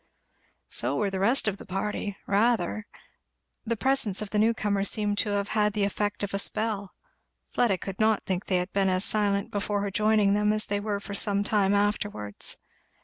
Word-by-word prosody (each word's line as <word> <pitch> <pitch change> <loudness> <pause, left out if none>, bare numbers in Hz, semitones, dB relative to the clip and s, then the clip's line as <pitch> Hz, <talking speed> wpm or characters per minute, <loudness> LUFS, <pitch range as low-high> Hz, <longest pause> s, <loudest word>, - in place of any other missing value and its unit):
So - - +1
were 205 -2 0
the 190 - -3
rest 225 +5 +3
of 200 -2 0
the - - -10
party 200 +1 -3
rather. 215 0 +1 0.8
The 230 0 -1
presence 260 -6 +2
of 210 -2 -3
the 210 - +1
new 220 +2 +4
comer 205 -3 -1
seemed 205 0 -1
to 210 - +1 0.2
have 210 0 +1
the 210 -1 0
effect 205 +1 -1
of 200 - -3
a 195 - 0
spell. 210 -2 -1 0.6
Fleda 230 -6 +2
could 195 +1 -7
not 220 -1 +2
think 185 0 -3
they 185 - +2
had 180 +1 -3
been 195 -1 +2
as 185 +1 +2
silent 200 -2 +1
before 205 0 -1
her 200 - -3
joining 210 -1 +3
them 210 +1 +2
as 215 0 +1
they 205 0 -1
were 205 -1 -2
for 200 0 -8
some 200 0 0
time 205 -1 +2
afterwards. 205 - -1
205 Hz, 195 wpm, -27 LUFS, 195-215 Hz, 0.8 s, new